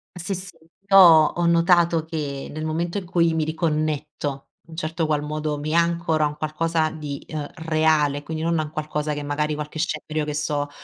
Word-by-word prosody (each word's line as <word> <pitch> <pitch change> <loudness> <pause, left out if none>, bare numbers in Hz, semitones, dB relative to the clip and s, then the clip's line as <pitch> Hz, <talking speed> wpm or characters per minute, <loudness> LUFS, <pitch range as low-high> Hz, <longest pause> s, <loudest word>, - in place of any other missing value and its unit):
Sì, 180 +2 -3
sì, 185 -1 -7 0.3
io 195 - +7
ho 170 -1 +6
notato 170 -1 +3
che 145 -4 -4
nel 155 - -5
momento 170 +5 -2
in 185 - -10
cui 170 -2 +2
mi 160 -1 0
riconnetto, 150 -3 -2 0.2
un 165 - -11
certo 160 0 -2
qual 150 -1 0
modo, 150 0 -3
mi 155 +2 -3
ancora 170 -2 +2
un 150 0 -7
qualcosa 155 +1 0
di, 150 -3 -5
ehm, 150 -2 -4
reale 155 -3 +1
quindi 160 +1 -5
non 165 -1 +1
a - - +1
un 150 - -7
qualcosa 150 0 -3
che 145 - -4
magari 150 +1 -1
qualche 150 +1 -6
scenario 155 -2 -2
che 150 -1 -4
sto 145 -1 -1
155 Hz, 190 wpm, -23 LUFS, 150-165 Hz, 0.3 s, io